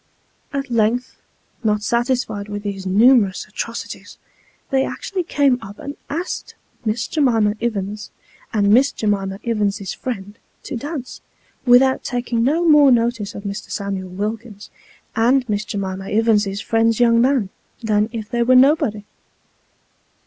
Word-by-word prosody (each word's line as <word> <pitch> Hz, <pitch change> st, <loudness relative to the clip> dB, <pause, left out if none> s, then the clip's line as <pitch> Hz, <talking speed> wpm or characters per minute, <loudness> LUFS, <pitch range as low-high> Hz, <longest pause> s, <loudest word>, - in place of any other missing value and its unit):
At 275 Hz, -2 st, -4 dB
length, 235 Hz, +2 st, 0 dB, 0.4 s
not 210 Hz, -1 st, +1 dB
satisfied 235 Hz, -4 st, -1 dB
with 205 Hz, 0 st, -5 dB
these 195 Hz, -2 st, -4 dB
numerous 210 Hz, -1 st, +4 dB
atrocities, 230 Hz, +2 st, -7 dB, 0.5 s
they 265 Hz, 0 st, +3 dB
actually 380 Hz, +6 st, -3 dB
came 285 Hz, -7 st, +2 dB
up 200 Hz, +1 st, -10 dB
and 285 Hz, +1 st, -7 dB
asked 335 Hz, +5 st, -4 dB, 0.3 s
Miss 220 Hz, +1 st, -1 dB
J'mima 230 Hz, -9 st, +2 dB
Ivins, 210 Hz, -2 st, -3 dB, 0.4 s
and 205 Hz, -3 st, +2 dB
Miss 265 Hz, +5 st, +5 dB
J'mima 195 Hz, -2 st, -1 dB
Ivins's 205 Hz, -4 st, -1 dB
friend, 205 Hz, -4 st, -6 dB, 0.2 s
to -, -, -5 dB
dance, 280 Hz, +1 st, -6 dB, 0.5 s
without 260 Hz, +2 st, +5 dB
taking 240 Hz, -2 st, -1 dB
no 325 Hz, +7 st, +2 dB
more 295 Hz, -3 st, +7 dB
notice 230 Hz, -3 st, +1 dB
of 200 Hz, -, -7 dB
Mr. 200 Hz, 0 st, -6 dB
Samuel 195 Hz, -2 st, -4 dB
Wilkins, 210 Hz, +2 st, -5 dB, 0.4 s
and 245 Hz, +3 st, +3 dB
Miss 210 Hz, -1 st, -1 dB
J'mima 195 Hz, -2 st, -4 dB
Ivins's 210 Hz, -2 st, +2 dB
friend's 225 Hz, +1 st, +1 dB
young 230 Hz, -1 st, +5 dB
man. 255 Hz, -6 st, +2 dB, 0.3 s
than 215 Hz, 0 st, +1 dB
if 220 Hz, -3 st, -5 dB
they 235 Hz, +2 st, -1 dB
was 255 Hz, +2 st, +5 dB
nobody 255 Hz, -6 st, +3 dB
225 Hz, 135 wpm, -20 LUFS, 205-255 Hz, 0.5 s, more